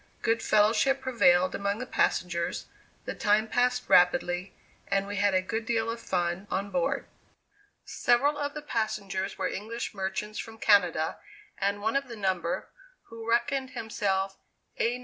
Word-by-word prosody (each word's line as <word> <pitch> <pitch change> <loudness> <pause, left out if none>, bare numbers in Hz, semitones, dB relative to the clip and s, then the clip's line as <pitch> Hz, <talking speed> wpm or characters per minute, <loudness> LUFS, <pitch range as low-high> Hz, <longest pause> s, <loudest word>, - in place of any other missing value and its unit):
Good 230 0 +2
fellowship 220 +6 +3
prevailed 185 -8 +3
among 200 +1 -1
the 250 - -4
passengers, 175 -8 0 0.4
the - - -3
time 210 +1 +2
passed 250 +2 +1
rapidly, 180 -1 +3 0.3
and 195 0 +1
we 205 0 -5
had 200 -1 +3
a 185 - +2
good 225 +4 -3
deal 230 0 0
of 230 - -5
fun 180 +1 -1
on 200 +2 -2
board. 275 +1 0 0.8
Several 275 +5 +2
of 290 0 -3
the 300 - -6
passengers 200 -6 -2
were - - 0
English 225 +4 -5
merchants 195 +2 -3
from 225 -1 -7
Canada 180 -7 +3 0.4
and 200 +1 -1
one 220 +3 0
of 275 0 0
the 235 - -7
number, 185 -5 -1 0.4
who 230 0 -8
reckoned 260 +3 +1
himself 195 -3 -1 0.4
"A, 240 +2 +1
No. - - -12
210 Hz, 155 wpm, -28 LUFS, 190-235 Hz, 0.8 s, fellowship